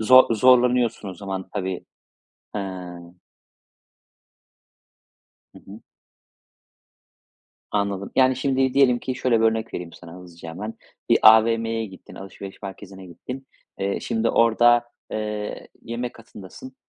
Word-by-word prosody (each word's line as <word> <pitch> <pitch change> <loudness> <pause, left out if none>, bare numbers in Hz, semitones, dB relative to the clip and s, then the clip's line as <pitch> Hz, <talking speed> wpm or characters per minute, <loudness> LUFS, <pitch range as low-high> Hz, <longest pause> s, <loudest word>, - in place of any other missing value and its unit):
zor 130 +1 +6
zorlanıyorsun 125 -2 +3
o 95 - -7
zaman 95 0 -6
tabii. 95 -1 -4 0.7
He. 105 - -3 2.9
Hı - - -13
hı. 100 +3 -12 1.9
Anladım, 100 -1 -1
yani, 130 -1 +4
şimdi 130 0 +1
diyelim 130 -3 +4
ki, 130 - -4
şöyle 125 -2 +1
bir - - +4
örnek 110 0 0
vereyim 85 -1 -6
sana 85 -1 -12
hızlıca 85 -2 -11
hemen, 105 +7 -6 0.4
bir - - +6
AVM'ye 115 0 +5
gittin, 95 -2 -13
alışveriş 95 +1 -10
merkezine 95 -1 -9
gittin. 125 +10 -9 0.3
Eee, 100 0 -1
şimdi 115 0 -1
orada, 120 +1 +4 0.3
eee, 105 -1 -4
yemek 120 +1 -5
katındasın. 115 +3 -12
110 Hz, 115 wpm, -23 LUFS, 95-120 Hz, 2.9 s, zor